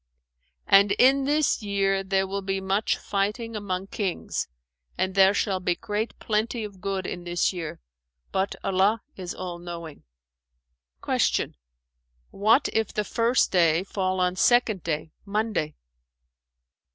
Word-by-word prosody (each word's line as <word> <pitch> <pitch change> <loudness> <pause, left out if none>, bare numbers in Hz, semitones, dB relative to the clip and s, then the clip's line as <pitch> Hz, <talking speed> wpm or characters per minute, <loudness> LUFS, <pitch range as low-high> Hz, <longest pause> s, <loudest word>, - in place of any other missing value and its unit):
[FN#423] 60 0 -48
And, 200 0 +1
in 270 +2 +5
this 295 -2 +2
year 195 -1 0
there 190 0 +1
will 200 +1 -3
be 195 0 -2
much 195 +3 0
fighting 210 +3 -2
among 190 -3 -3
kings, 195 -2 -3 0.5
and 185 0 0
there 195 +1 +5
shall 195 -3 0
be 180 -1 0
great 215 +2 -3
plenty 220 +2 -1
of 200 -3 -9
good 195 -1 -2
in 175 -1 -5
this 175 +2 0
year, 165 -4 -5 0.5
but 190 +1 0
Allah 195 +3 +2
is 180 -2 -6
All 180 -2 -6
knowing!" 170 -3 -8 1.0
Q - - +1 0.8
"What 220 +7 +3
if 220 -2 0
the 210 - -1
first 235 +4 +2
day 170 -1 +3
fall 185 -1 -2
on 180 0 +1
Second 230 -4 +3
Day 160 -1 -3
(Monday)?" 205 -7 -1
195 Hz, 140 wpm, -26 LUFS, 180-210 Hz, 1.0 s, in